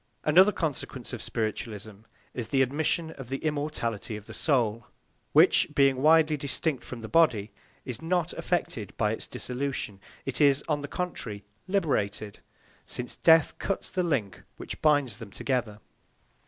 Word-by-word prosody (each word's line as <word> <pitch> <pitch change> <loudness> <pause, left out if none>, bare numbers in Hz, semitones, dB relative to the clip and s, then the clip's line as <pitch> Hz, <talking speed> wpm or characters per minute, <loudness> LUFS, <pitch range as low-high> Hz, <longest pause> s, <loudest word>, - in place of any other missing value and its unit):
Another 185 +7 +6
consequence 140 - -4
of 120 - -4
spiritualism 110 -2 -4 0.4
is 120 -3 -4
the 135 +1 +3
admission 160 +4 0
of 135 -5 -10
the 135 - -1
immortality 145 -9 -2
of 105 - -12
the - - -10
soul, 115 -6 +1 0.4
which, - - +5
being 135 -2 +4
widely 155 +2 +5
distinct 140 -1 -1
from 125 -2 -8
the 110 - -6
body, 115 -11 +3 0.3
is 125 -4 -6
not 175 0 0
affected 120 - -2
by 105 -1 +2
its 110 - -4
dissolution; 125 -6 -4 0.2
it 135 +2 -1
is, 140 -1 +5
on 150 -2 0
the 145 - -5
contrary, 120 - -4 0.2
liberated, 110 - -1 0.4
since 125 0 -3
death 160 -2 +4
cuts 195 - -3
the 185 - 0
link 130 - -1 0.2
which - - -7
binds 145 -8 +2
them 115 -4 -8
together. 115 -2 -2
135 Hz, 150 wpm, -28 LUFS, 110-155 Hz, 0.4 s, Another